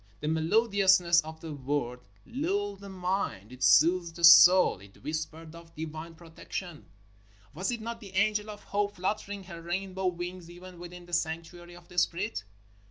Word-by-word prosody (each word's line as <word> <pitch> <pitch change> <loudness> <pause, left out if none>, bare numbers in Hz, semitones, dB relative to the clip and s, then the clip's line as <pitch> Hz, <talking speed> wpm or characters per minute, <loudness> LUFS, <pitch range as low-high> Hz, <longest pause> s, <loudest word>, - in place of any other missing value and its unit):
The 150 - -4
melodiousness 185 +1 +3
of 160 +1 -10
the 160 -2 -6
word 135 -3 -3 0.3
lulled 395 +10 -2
the 200 - -10
mind. 180 - -3
It 130 0 -12
soothed 165 +5 +4
the 170 - -9
soul. 180 - +8
It 100 +1 -17
whispered 155 +1 -5
of 170 0 -14
divine 160 +1 -7
protection. 170 0 -8 0.7
Was 185 +6 -3
it 240 -2 -3
not 230 +1 -5
the 195 -4 -12
angel 210 +1 +1
of 205 -1 -9
Hope 205 0 -2
flut 185 +4 -1
tering 200 -1 -8
her 170 -2 -9
rainbow 190 +2 -3
wings, 175 0 -5
even 180 0 -12
within 175 0 -10
the 175 - -15
sanctuary 170 +1 -3
of 175 -1 -16
the 180 0 -1
Spirit? 180 - -1
175 Hz, 165 wpm, -29 LUFS, 160-195 Hz, 0.7 s, soul